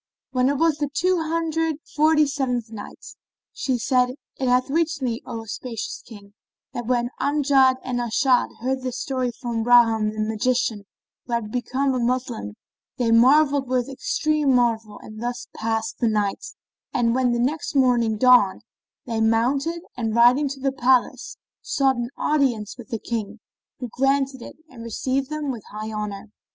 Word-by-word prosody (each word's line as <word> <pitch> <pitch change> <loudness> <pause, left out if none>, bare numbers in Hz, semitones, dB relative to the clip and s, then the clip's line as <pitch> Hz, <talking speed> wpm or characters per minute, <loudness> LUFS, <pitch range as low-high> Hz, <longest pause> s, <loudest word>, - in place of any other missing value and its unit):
When 255 0 +2
it 285 - 0
was 325 0 +2
the 290 -2 -1
Two 360 +4 +1
Hundred 325 0 -1
and 295 - -12 0.2
Forty 310 0 +4
seventh 250 -5 -2
Night, 210 -2 -10 0.5
She 260 -2 -1
said, 250 +2 +1 0.2
It 260 - 0
hath 250 +1 +3
reached 320 -2 0
me, 235 -2 -2
O 230 -2 -5
auspicious 225 +1 -6
King, 205 -3 -14 0.4
that 240 -2 -5
when 245 -1 0
Amjad 275 -2 +3
and 250 -1 -2
As'ad 245 +2 +2
heard 260 +2 -1
this 255 -1 -4
story 255 -2 -2
from 235 -2 -4
Bahram 225 -3 +4
the 215 - -7
Magian 220 -1 -1 0.4
who 240 - -4
had 225 -2 -2
become 260 +3 -1
a 255 - -1
Moslem, 240 - -2 0.4
they 235 -2 +1
marvelled 275 +4 +4
with 255 0 0
extreme 290 +1 0
marvel 225 -3 0
and 215 0 -10
thus 245 +1 -4
passed 225 0 -2
that 235 - +2
night; 210 -3 0 0.5
and 230 -1 +1
when 255 -1 +2
the 240 - 0
next 285 +6 -1
morning 240 -5 +3
dawned, 245 -5 +5 0.4
they 225 -2 -2
mounted 270 +10 +1
and 225 -3 -2
riding 245 +5 +5
to 275 0 -7
the 270 0 0
palace, 260 - +1 0.2
sought 270 -3 +1
an 240 0 -3
audience 260 -8 0
of 240 - -10
the 225 - -3
King 220 -2 -5 0.4
who 250 - -5
granted 270 +1 0
it - - -10
and 250 -6 -13
received 260 +4 -2
them 305 -2 -3
with 230 -5 -7
high 215 +1 -6
honour. 210 -1 -5
250 Hz, 165 wpm, -23 LUFS, 230-275 Hz, 0.5 s, dawned